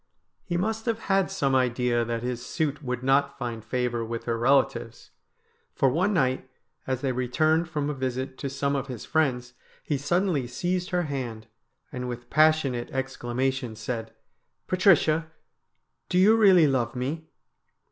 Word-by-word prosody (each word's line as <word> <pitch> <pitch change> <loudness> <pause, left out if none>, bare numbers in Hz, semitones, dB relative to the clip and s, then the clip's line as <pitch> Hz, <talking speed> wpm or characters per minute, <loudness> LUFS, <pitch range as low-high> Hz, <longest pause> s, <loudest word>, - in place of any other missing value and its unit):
He 175 -2 -2
must 220 +5 -2
have 230 -2 +1
had 195 -5 +1
some 135 -1 0
idea 125 -2 +2
that 115 0 -3
his 125 -1 -3
suit 150 +2 -2
would 125 -3 -4
not 140 +1 +2
find 120 -4 -5
favour 120 0 -1
with 115 0 -5
her 115 - -1
relatives, 125 -1 +1 0.6
for 135 - +3
one 180 +10 +1
night, 130 -7 0 0.4
as 130 -1 -1
they 135 -2 0
returned 155 +7 +1
from 150 -3 -2
a 150 - -1
visit 130 0 -3
to 140 - -3
some 140 +1 -1
of 135 -1 -2
his 125 -5 -7
friends, 125 -6 0 0.3
he 145 -3 -1
suddenly 165 -2 0
seized 180 +8 -2
her 180 -2 0
hand, 125 -7 -4 0.5
and 125 0 -4
with 120 0 -7
passionate 155 -6 +3
exclamation 130 -2 -2
said: 115 +1 -5 0.3
' - - -50
Patricia, 165 -4 +3 0.8
do 180 - +1
you 205 +4 +6
really 190 -7 +6
love 130 -4 0
me 145 +6 -3
135 Hz, 155 wpm, -26 LUFS, 125-160 Hz, 0.8 s, you